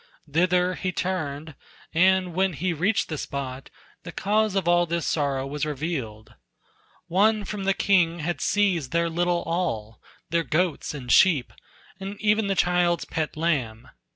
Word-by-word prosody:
Thither 180 +4 +2
he 185 0 -3
turned, 160 -5 -3 0.4
and 185 +1 +3
when 190 +1 +1
he 175 +4 -1
reached 185 +7 +1
the 155 -3 -4
spot, 135 -1 -5 0.3
The 170 - -8
cause 210 +2 0
of 190 -3 0
all 175 0 +4
this 170 0 -2
sorrow 140 -3 0
was 145 +1 -4
revealed: 135 -8 -4 0.7
One 210 +3 +2
from 200 -1 -5
the 195 0 +2
king 175 -4 +2
had 170 +2 -3
seized 185 -10 +1
their 170 0 +1
little 175 +1 0
all, 155 -11 -3 0.3
Their 170 0 +2
goats 165 -1 -1
and 125 -3 -5
sheep, 160 -10 +4 0.5
and 195 +1 -7
e'en 215 0 +2
the 195 - 0
child's 175 -1 +2
pet 160 -2 -3
lamb. 130 -9 -1
170 Hz, 155 wpm, -25 LUFS, 150-185 Hz, 0.7 s, all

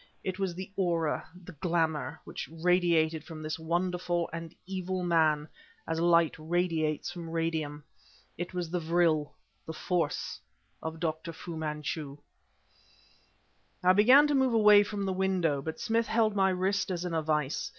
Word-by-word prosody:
It 185 0 -3
was 190 -3 -1
the 185 +2 -7
aura, 170 -5 0
the 180 - -10
glamour, 160 -3 -1
which - - -7
radiated 165 -2 +2
from 160 -2 -9
this 155 +1 -4
wonderful 175 +1 -1
and 165 0 -6
evil 185 -1 -3
man 155 -3 +2 0.4
as 165 0 -1
light 170 -1 +4
radiates 160 -1 -1
from 170 -2 -7
radium. 160 -3 -2 0.5
It 175 +1 -5
was 175 -3 -4
the 180 - 0
vril, 160 -3 +2 0.4
the 160 - -4
force, 165 -2 -2 0.4
of 160 0 -5
Dr. 160 0 -3
Fu 165 +1 -8
Manchu. 150 -2 -4 1.7
I 180 +1 +6
began 250 +9 +7
to 295 - +1
move 265 -3 +3
away 210 -2 +7
from 205 -1 -3
the 190 - -1
window. 185 -6 +1
But 160 +2 -5
Smith 230 0 0
held 220 -2 +2
my 190 -1 +3
wrist 190 +2 0
as 180 -1 -3
in 175 - -3
a 160 - +1
vise. 150 -2 -1
170 Hz, 155 wpm, -30 LUFS, 160-185 Hz, 1.7 s, began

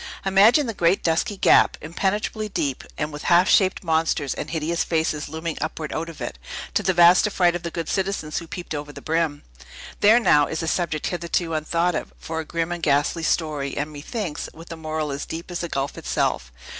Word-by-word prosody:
Imagine 205 +9 +5
the 230 - -3
great, 175 0 +2
dusky 175 +6 0
gap, - - +5
impenetrably 205 +6 -2
deep, 145 -9 -2
and 150 0 -3
with 150 - -7
half 175 +1 +5
shaped 190 -1 +3
monsters 160 -4 +1
and - - -5
hideous 165 +1 -1
faces 160 -3 -1
looming 160 +1 -4
upward 155 0 -4
out 165 +1 -3
of 165 - -11
it, - - -5 0.3
to - - +2
the - - +2
vast 175 +3 +6
affright 180 -4 +2
of 175 - -3
the 170 - -4
good 165 -1 -4
citizens 190 -5 -1
who 170 - -10
peeped 175 0 -6
over 145 0 -5
the - - -10
brim! 160 -2 -1 0.6
There, 220 +4 +6
now, 150 -11 +4
is 160 0 -3
a - - -3
subject, 160 -2 -1
hitherto 170 -1 -1
unthought 165 +3 0
of, 155 - -4
for 160 0 -5
a 160 - -4
grim 170 +1 -2
and 175 -1 -4
ghastly 145 +2 +2
story, 155 -4 -1
and, 150 +2 -2
methinks, 155 +3 -5
with 165 +2 -12
a - - -4
moral 155 -2 -3
as 140 +1 -4
deep 165 +2 -6
as 175 - -3
the 170 - -3
gulf 140 -1 -2
itself. 60 -1 -1
165 Hz, 205 wpm, -23 LUFS, 155-175 Hz, 0.6 s, vast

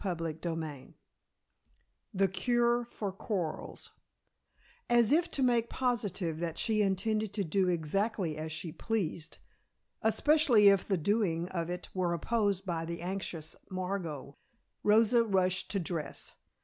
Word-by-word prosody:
CHAPTER 170 -4 -2
IX 160 -3 -5 1.2
THE 195 0 +2
CURE 240 +5 +1
FOR 210 -4 -4
QUARRELS 185 -4 -4 1.0
As 240 0 +5
if 335 +3 +3
to 275 - -1
make 235 -2 +2
positive 205 -10 -1
that 165 -1 -3
she 215 -1 +1
intended 210 +2 0
to 205 -1 -1
do 185 +2 +1
exactly 180 +1 0
as 155 +1 -5
she 160 +1 -4
pleased, 175 -6 -3 0.6
especially 235 -1 +5
if 195 -2 +3
the 195 - +1
doing 175 -2 0
of 170 -2 -3
it 180 0 -5
were 180 -2 0
opposed 200 +1 0
by 170 -3 -2
the 170 +1 -5
anxious 175 -4 -4
Margot, 180 -7 -4 0.5
Rosa 225 +3 +5
rushed 185 -3 +1
to 200 - 0
dress. 165 -3 -4
190 Hz, 130 wpm, -31 LUFS, 165-220 Hz, 1.2 s, As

